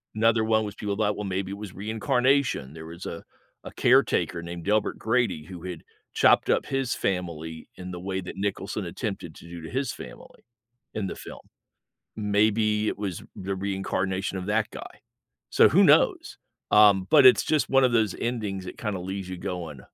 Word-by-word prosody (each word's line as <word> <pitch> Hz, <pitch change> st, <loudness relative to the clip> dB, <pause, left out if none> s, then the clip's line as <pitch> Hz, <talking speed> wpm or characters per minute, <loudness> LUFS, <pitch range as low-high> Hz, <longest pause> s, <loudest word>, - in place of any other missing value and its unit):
Another 115 Hz, 0 st, +3 dB
one 110 Hz, 0 st, +2 dB
was 105 Hz, -1 st, -6 dB
people 100 Hz, -2 st, -3 dB
thought, 105 Hz, -1 st, +1 dB
"Well, 105 Hz, -, -5 dB
maybe 95 Hz, 0 st, -3 dB
it 100 Hz, -, -5 dB
was 105 Hz, -3 st, -8 dB
reincarnation." 115 Hz, -, 0 dB
There 80 Hz, 0 st, -9 dB
was 85 Hz, +2 st, -9 dB
a 85 Hz, -, -6 dB, 0.4 s
a -, -, -8 dB
caretaker 85 Hz, -, +2 dB
named 85 Hz, 0 st, -7 dB
Delbert 105 Hz, +1 st, +1 dB
Grady 110 Hz, -8 st, 0 dB
who 90 Hz, -2 st, -10 dB
had 90 Hz, -3 st, -6 dB, 0.3 s
chopped -, -, +4 dB
up -, -, +2 dB
his 135 Hz, -2 st, -1 dB
family 80 Hz, -4 st, -3 dB
in 90 Hz, 0 st, -8 dB
the 90 Hz, -, -6 dB
way 95 Hz, +1 st, -3 dB
that 90 Hz, -, -8 dB
Nicholson 100 Hz, +1 st, -3 dB
attempted 85 Hz, -2 st, -5 dB
to -, -, -14 dB
do 85 Hz, 0 st, -8 dB
to 80 Hz, -, -8 dB
his 135 Hz, +3 st, -2 dB
family -, -, -12 dB, 0.5 s
in 105 Hz, -3 st, -2 dB
the -, -, -5 dB
film. -, -, -10 dB, 0.8 s
Maybe 105 Hz, +1 st, +2 dB
it -, -, -3 dB
was 100 Hz, -4 st, -4 dB
the 95 Hz, +1 st, -4 dB
reincarnation 95 Hz, 0 st, -2 dB
of 90 Hz, -, -6 dB
that 105 Hz, +1 st, 0 dB
guy. -, -, -10 dB, 0.5 s
So, -, -, +6 dB
who -, -, +5 dB
knows? -, -, +3 dB, 0.3 s
Um, 100 Hz, -3 st, +6 dB
but 150 Hz, -3 st, +7 dB
it's 130 Hz, -, +7 dB
just 155 Hz, -2 st, +1 dB
one 135 Hz, 0 st, +5 dB
of 125 Hz, -, +3 dB
those 110 Hz, -5 st, +2 dB
endings 105 Hz, -6 st, -3 dB
that -, -, -8 dB
kinda 105 Hz, -5 st, -3 dB
leaves 95 Hz, +1 st, -5 dB
you 90 Hz, -1 st, -6 dB
going, 85 Hz, -7 st, -5 dB
100 Hz, 185 wpm, -26 LUFS, 90-110 Hz, 0.8 s, but